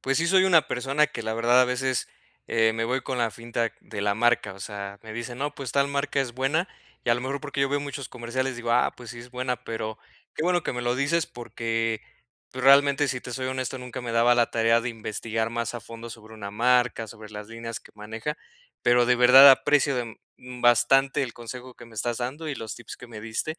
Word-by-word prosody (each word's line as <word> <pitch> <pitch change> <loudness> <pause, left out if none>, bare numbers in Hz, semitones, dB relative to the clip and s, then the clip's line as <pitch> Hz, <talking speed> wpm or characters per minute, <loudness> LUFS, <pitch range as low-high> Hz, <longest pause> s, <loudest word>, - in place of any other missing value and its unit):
pues 135 0 0
sí 165 - +2
soy 190 +1 +5
una 170 -5 +5
persona 135 +4 +1
que, 150 - -7
la 110 0 -2
verdad, 120 +2 +4
a - - +6
veces, 125 0 -1 0.4
eh, 110 -1 +2
me 115 0 -2
voy 130 +3 -1
con 130 - -3
la 115 -1 +1
finta 115 +1 -3
de 105 - -7
la 100 0 +1
marca, 115 -3 +1
o 95 - -14
sea, 100 0 -6
me 110 -1 -9
dicen 120 +2 -5
no, 145 +1 -3
pues 135 -5 -6
tal 140 0 +2
marca 140 0 -1
es 130 -3 -1
buena, 135 +8 0 0.4
y 120 - +2
a - - +5
lo 120 - -3
mejor, 135 +2 -3
porque 140 -1 -4
yo 135 - +3
veo 145 +1 0
muchos 140 -2 -6
comerciales 125 +2 -3
digo, 120 -1 -3
ah, 125 - +2
pues 120 -2 -10
sí 120 - -9
es 120 +1 -11
buena, 125 -1 -3
pero 110 -2 -5 0.4
qué - - -3
bueno 175 0 +2
que - - -2
me 125 - -3
lo 120 0 0
dices 155 +4 +1
porque, 115 -2 -3 0.5
pues 130 0 -5
realmente, 140 +1 +5
si 125 -1 -2
te - - -9
soy 130 +2 -4
honesto, 130 0 -3
nunca 125 -1 -7
me 120 -2 -5
daba 120 +1 +4
la 120 -1 +2
tarea 115 0 +3
de 120 - -3
investigar 110 0 -3
más 115 +1 -3
a 120 - -5
fondo 115 +1 -10
sobre 110 -1 -12
una 100 -2 -7
marca, 120 +1 +2
sobre 110 0 -11
las 105 0 -8
líneas 115 0 -6
que - - -19
maneja, 110 +8 -5 0.4
pero 120 0 +4
de 125 0 +3
verdad 130 +3 +10
aprecio, 135 -1 +3 0.4
mm, 125 -1 -10
bastante 135 +3 +4
el 120 -4 -4
consejo 125 +1 -9
que - - -13
me 115 - -16
estás 115 +2 -1
dando 135 +7 -4
y 145 - -2
los 110 -6 -6
tips 120 -1 -10
que 125 - -12
me 110 -3 -9
diste. 115 +9 -3
120 Hz, 240 wpm, -26 LUFS, 115-135 Hz, 0.5 s, verdad